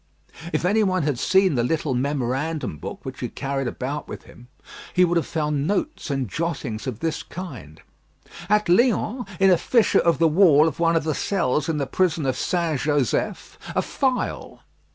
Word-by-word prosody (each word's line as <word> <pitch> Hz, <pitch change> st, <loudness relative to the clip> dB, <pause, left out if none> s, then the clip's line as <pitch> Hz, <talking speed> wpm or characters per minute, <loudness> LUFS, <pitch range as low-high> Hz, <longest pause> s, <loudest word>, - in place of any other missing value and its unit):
If -, -, -1 dB
any 210 Hz, +4 st, +3 dB
one 185 Hz, -4 st, +1 dB
had 140 Hz, -5 st, -1 dB
seen 190 Hz, +1 st, +3 dB
the 120 Hz, -3 st, +1 dB
little 150 Hz, +1 st, -1 dB
memorandum 135 Hz, -, -2 dB
book -, -, -8 dB
which -, -, -7 dB
he -, -, -3 dB
carried 135 Hz, -1 st, -3 dB
about 135 Hz, +5 st, -4 dB
with -, -, -8 dB
him, 125 Hz, -, -16 dB, 0.5 s
he 180 Hz, 0 st, +6 dB
would 175 Hz, 0 st, 0 dB
have 170 Hz, -, +1 dB
found 150 Hz, -2 st, -1 dB
notes 205 Hz, -, -2 dB
and 135 Hz, -3 st, -1 dB
jottings 140 Hz, -, -4 dB
of 120 Hz, -4 st, -5 dB
this 165 Hz, -1 st, -1 dB
kind: 130 Hz, -, -9 dB, 0.7 s
"At 210 Hz, -1 st, +3 dB
Lyons 235 Hz, +3 st, +2 dB
in 195 Hz, 0 st, +5 dB
a 175 Hz, -, +4 dB
fissure 235 Hz, -4 st, +3 dB
of 170 Hz, -, +2 dB
the 165 Hz, -, +4 dB
wall 160 Hz, -2 st, +5 dB
of 160 Hz, -, -4 dB
one 165 Hz, 0 st, +3 dB
of 165 Hz, -, +2 dB
the 155 Hz, 0 st, -1 dB
cells 155 Hz, -4 st, 0 dB
in 160 Hz, -, 0 dB
the 140 Hz, -, -1 dB
prison 165 Hz, +1 st, 0 dB
of 130 Hz, -1 st, 0 dB
St. 165 Hz, -1 st, -1 dB
Joseph, 145 Hz, -2 st, -1 dB, 0.2 s
a -, -, +2 dB
file." 260 Hz, -3 st, -2 dB
160 Hz, 185 wpm, -23 LUFS, 135-180 Hz, 0.7 s, he